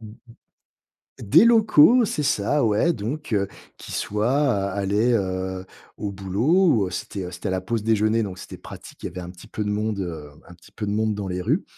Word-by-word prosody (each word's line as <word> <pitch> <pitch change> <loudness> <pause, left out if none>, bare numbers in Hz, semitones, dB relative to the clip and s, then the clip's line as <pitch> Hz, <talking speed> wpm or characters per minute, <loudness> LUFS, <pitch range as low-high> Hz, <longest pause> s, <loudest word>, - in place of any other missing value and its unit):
Mmh 110 - -10
mh. 105 - -12 1.1
Des 155 - +5
locaux, 230 0 +6
c'est 160 -7 -2
ça, 140 +1 +1
ouais. 110 +10 +2
Donc 120 +3 -5
heu, 100 -2 +1 0.3
qui - - -11
soit, 105 +4 -1
a 125 -9 +1
allaient, 100 +5 +1
heu, 95 -2 -2 0.3
au 100 -1 -4
boulot, 110 - +2
ou - - -5
c'était, 95 +1 -5
heu, 90 - -7
c'était 85 +2 -4
la 95 - -1
pause 110 +4 -2
déjeuner, 110 +1 +2
donc 95 -3 -5
c'était - - -9
pratique, - - -12
y - - -3
avait 90 - -8
un 90 0 -7
petit 90 -1 -14
peu 105 - -4
de 105 - -3
monde, 105 0 -1
heu, 80 -6 -5 0.2
un 85 - -13
petit 85 - -20
peu 105 - -5
de 100 - -1
monde 110 0 0
dans 100 -2 -4
les 90 0 -3
rues - - 0
105 Hz, 215 wpm, -23 LUFS, 95-120 Hz, 1.1 s, locaux